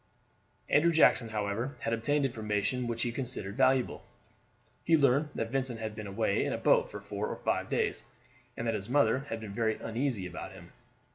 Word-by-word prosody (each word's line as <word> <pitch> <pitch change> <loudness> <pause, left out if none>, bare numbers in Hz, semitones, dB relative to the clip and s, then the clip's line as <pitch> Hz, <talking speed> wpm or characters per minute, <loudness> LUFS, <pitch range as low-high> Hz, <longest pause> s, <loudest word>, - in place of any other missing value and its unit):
Andrew 170 +3 +4
Jackson, 125 -7 +4
however, 110 +5 -2
had 115 - -1
obtained 145 +5 +1
information 110 +1 -1
which 115 -1 -1
he 120 - -1
considered 115 -6 -3
valuable. 130 -1 +2 0.8
He 165 0 +4
learned 140 +1 +3
that 115 0 -3
Vincent 130 -3 -2
had 110 -1 -4
been 110 -1 -6
away 100 0 0
in - - -1
a - - -1
boat - - +3
for 100 0 -4
five - - 0
days, - - 0 0.6
and 115 - -3
that 115 - +1
his 105 0 -4
mother 130 0 +3
had 115 - -3
been 110 -3 -7
very 110 0 +1
uneasy 115 -3 -2
about 90 0 -7
him. - - -14
115 Hz, 180 wpm, -30 LUFS, 105-130 Hz, 0.8 s, Andrew